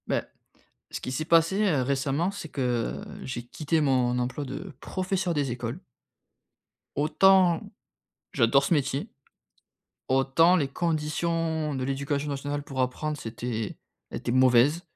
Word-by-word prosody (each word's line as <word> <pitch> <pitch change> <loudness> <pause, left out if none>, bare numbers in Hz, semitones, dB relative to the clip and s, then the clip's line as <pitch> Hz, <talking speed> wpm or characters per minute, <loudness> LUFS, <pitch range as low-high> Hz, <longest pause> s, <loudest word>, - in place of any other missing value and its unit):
Bah, - - 0 0.7
ce - - -5
qui 130 - -5
s'est 145 +4 -2
passé, 165 +5 +3
heu, 155 -10 +2
récemment, 140 +6 0
c'est 200 -5 -7
que, 145 - -6 0.4
heu, - - -10
j'ai 125 -2 -4
quitté 155 +5 -1
mon 130 -4 +2
emploi 125 +4 -2
de 140 +7 -7
professeur 185 -2 -2
des 145 -4 0
écoles 120 +5 -4 1.2
autant 175 +3 +4 0.7
j'adore 120 +4 +4
ce 170 - +2
métier, 145 - -1 1.0
autant 135 +7 +4
les 145 -5 +1
conditions 160 0 -1
de 130 - -2
l'Éducation 140 +2 -2
Nationale 145 +1 -3
pour 135 -2 -3
apprendre, 150 +4 -2
c'était 115 -3 -4 0.4
était 120 - -2
mauvaise 130 +5 +5
145 Hz, 130 wpm, -27 LUFS, 130-165 Hz, 1.2 s, mauvaise